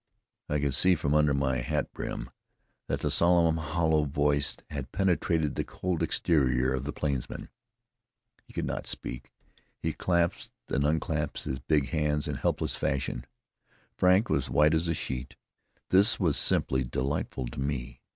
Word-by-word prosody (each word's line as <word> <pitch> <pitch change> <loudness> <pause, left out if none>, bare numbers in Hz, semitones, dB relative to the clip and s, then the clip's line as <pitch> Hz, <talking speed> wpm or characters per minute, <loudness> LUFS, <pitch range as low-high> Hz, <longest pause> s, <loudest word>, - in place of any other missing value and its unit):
I 75 - +1
could 70 -2 0
see 90 +7 +5
from 75 -2 -1
under 75 -2 +4
my 65 -2 +1
hat 65 - -2
brim - - -5 0.6
that - - -2
the - - 0
solemn, 85 -2 +4
hollow 80 0 +1
voice 75 -1 +1
had 70 -3 -5
penetrated 85 -5 +1
the - - -2
cold 90 -3 -3
exterior 65 -5 +2
of 65 +1 -3
the 75 - -2
plainsman. 70 -5 -3 0.9
He - - -18
could - - -3
not - - -4
speak; 60 0 -5 0.5
he - - -2
clasped 85 -1 0
and 70 - +1
unclasped 75 -1 -1
his 65 - -3
big 70 +1 +1
hands 75 -2 0
in - - -2
helpless - - -1
fashion. 65 -2 -2 0.7
Frank 95 +5 +4
was 70 - +1
as - - -9
white 75 +5 +4
as 80 +1 +1
a 85 - 0
sheet. 65 -3 -4 0.5
This 100 +5 +5
was 85 -7 +2
simply 65 -1 +2
delightful 65 +1 -2
to - - -8
me. 65 -3 -4
75 Hz, 160 wpm, -29 LUFS, 65-80 Hz, 0.9 s, see